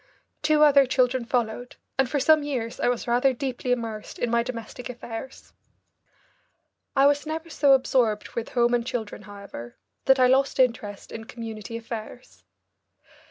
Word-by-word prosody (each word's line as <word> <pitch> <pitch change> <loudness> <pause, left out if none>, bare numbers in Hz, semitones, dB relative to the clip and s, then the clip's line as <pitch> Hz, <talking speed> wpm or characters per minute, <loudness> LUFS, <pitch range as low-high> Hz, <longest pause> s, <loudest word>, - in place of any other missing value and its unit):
Two 305 0 +4
other 280 -2 +6
children 255 -1 +1
followed, 245 0 -2 0.2
and 265 -2 +3
for 285 - 0
some 310 +2 +5
years 255 -6 -4
I - - +1
was 245 -1 -2
rather 250 +3 +3
deeply 255 -1 -3
immersed 225 -3 -3
in 240 - -1
my 235 0 +3
domestic 240 0 -6
affairs. 240 +1 -8 1.4
I 275 0 +5
was 290 +1 +3
never 320 +1 -5
so 280 -3 +4
absorbed 245 -5 +2
with 235 - -5
home 240 0 +4
and 240 -1 +2
children, 230 -5 -4
however, 200 - -10 0.3
that 265 0 +5
I 255 - +6
lost 265 +2 +2
interest 225 -5 0
in 225 0 -7
community 225 -1 -7
affairs. 230 +1 -8
Dr. - - -34
245 Hz, 160 wpm, -25 LUFS, 230-270 Hz, 1.4 s, other